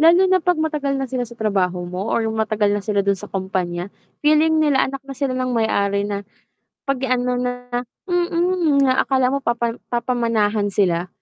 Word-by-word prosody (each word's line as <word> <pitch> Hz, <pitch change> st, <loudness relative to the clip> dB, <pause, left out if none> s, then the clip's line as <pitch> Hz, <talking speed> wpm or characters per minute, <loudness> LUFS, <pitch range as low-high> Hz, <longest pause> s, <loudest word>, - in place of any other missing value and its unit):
Lalo 335 Hz, +3 st, +6 dB
na 375 Hz, -1 st, +4 dB
'pag 360 Hz, 0 st, +1 dB
matagal 300 Hz, -3 st, -1 dB
na 270 Hz, -, -1 dB
sila 255 Hz, -1 st, -2 dB
sa 235 Hz, -, -13 dB
trabaho 185 Hz, -5 st, 0 dB
mo 180 Hz, +4 st, -4 dB
or 230 Hz, -, +1 dB
yung 220 Hz, 0 st, -2 dB
matagal 215 Hz, -2 st, +1 dB
na 205 Hz, -, 0 dB
sila 200 Hz, -2 st, +1 dB
do'n 200 Hz, -1 st, +2 dB
sa 210 Hz, -, -9 dB
kumpanya, 185 Hz, -1 st, -3 dB, 0.3 s
feeling 310 Hz, +1 st, +4 dB
nila 285 Hz, -4 st, +3 dB
anak 275 Hz, 0 st, -5 dB
na 275 Hz, -, -7 dB
sila 265 Hz, -2 st, -1 dB
ng 255 Hz, 0 st, -1 dB
may-ari 200 Hz, -3 st, +1 dB
na, 200 Hz, 0 st, -3 dB, 0.6 s
'pag 275 Hz, -2 st, +1 dB
ano 250 Hz, -1 st, +1 dB
na 245 Hz, 0 st, -3 dB, 0.2 s
mm, 345 Hz, -3 st, +2 dB
na 260 Hz, -1 st, +3 dB
akala 260 Hz, -2 st, +2 dB
mo 275 Hz, +1 st, -2 dB
papa 235 Hz, 0 st, 0 dB, 0.2 s
papamanahan 230 Hz, -4 st, +1 dB
sila. 180 Hz, -3 st, +1 dB
245 Hz, 185 wpm, -21 LUFS, 205-275 Hz, 0.6 s, Lalo